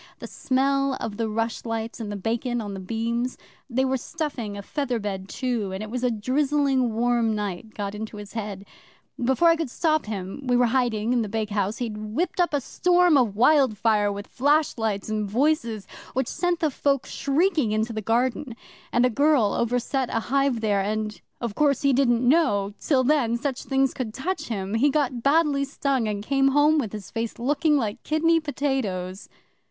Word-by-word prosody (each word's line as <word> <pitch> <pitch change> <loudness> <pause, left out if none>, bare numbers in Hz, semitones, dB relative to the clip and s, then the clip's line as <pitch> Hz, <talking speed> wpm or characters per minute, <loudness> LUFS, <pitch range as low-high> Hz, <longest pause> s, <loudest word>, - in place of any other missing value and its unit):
The - - -8
smell 275 +1 0
of 210 -2 -5
the 225 -1 -1
rushlights 225 +1 -3
and 215 -2 -5
the - - -4
bacon 235 +4 -2
on 205 -3 -5
the 195 - -6
beams 230 +5 -2 0.3
they 260 +2 +1
were 265 0 +1
stuffing 255 -8 -4
a 200 - -7
feather 265 0 -2
bed 195 -3 -5
too, 235 -6 -2
and 190 +2 -4
it 215 - -8
was 250 0 -3
a 250 - +3
drizzling 260 +1 +1
warm 235 -1 +2
night 210 +1 -5
got 200 -1 -4
into 215 0 -6
his 205 -1 -9
head. 205 -3 -5 0.6
Before 265 +7 +4
I 330 - +5
could 325 -5 -3
stop 310 0 0
him 195 +2 -5
we 250 -2 +2
were 245 - +4
hiding 240 -3 +1
in 245 - +2
the 215 - -3
bakehouse 210 -1 -1
he'd 225 -4 -4
whipped 225 +14 -3
up 350 - +2
a 290 -2 0
storm 355 +3 +3
of 240 -7 +2
wildfire, 220 -5 +3
with 200 0 -6
flashlights 245 -8 0
and 215 -1 -2
voices, 235 -4 0 0.3
which 260 -1 0
sent 355 +3 -1
the 315 -2 +2
folk 275 0 0
shrieking 300 - +1
into 220 +2 0
the 220 - -3
garden, 240 +3 0 0.4
and 240 +1 +3
a - - +3
girl 280 -4 +3
overset 245 +2 0
a 225 - 0
hive 275 -4 +2
there, 205 -3 +1
and 215 +1 -3 0.2
of 235 -4 -3
course 285 +2 +2
he 280 -1 +4
didn't 245 -2 +2
know 210 -10 +3
till 265 -4 +2
then 250 -4 +2
such 265 +1 -3
things 270 -1 +1
could 225 -4 -5
touch 360 +7 -3
him 195 -3 -3
he 250 +6 +3
got 270 -4 0
badly 285 0 +3
stung, 275 -4 -1
and 205 -1 -3
came 270 +1 +3
home 295 +3 +4
with 225 -8 -2
his 210 -3 -8
face 230 0 -3
looking 295 +5 +2
like 230 -2 -2
kidney 330 +2 +2
potatoes! 255 - -3
240 Hz, 190 wpm, -25 LUFS, 215-275 Hz, 0.6 s, I